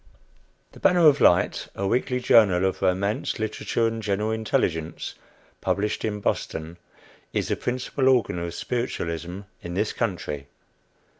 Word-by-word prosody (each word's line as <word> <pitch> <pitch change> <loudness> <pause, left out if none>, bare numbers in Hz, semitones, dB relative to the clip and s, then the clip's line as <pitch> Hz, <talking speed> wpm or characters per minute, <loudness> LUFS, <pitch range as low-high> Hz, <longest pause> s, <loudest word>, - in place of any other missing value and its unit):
"The - - -14
Banner 175 -2 +4
of 145 -2 +6
Light," 85 - +4
a 100 - -2
weekly 125 +4 +1
journal 100 -7 +5
of 95 - -1
romance, 95 +3 0
literature, 110 +1 -1
and 115 0 -1
general 105 +1 0
intelligence, 85 -7 -1 0.5
published 105 +1 -1
in 105 -1 -2
Boston, 80 -3 -2 0.6
is - - -1
the - - +1
principal 130 +2 0
organ 120 -9 +2
of 85 0 -4
spiritualism 90 -7 -3 0.2
in 85 0 -6
this 105 +3 0
country. 80 - -3
105 Hz, 135 wpm, -25 LUFS, 90-115 Hz, 0.6 s, of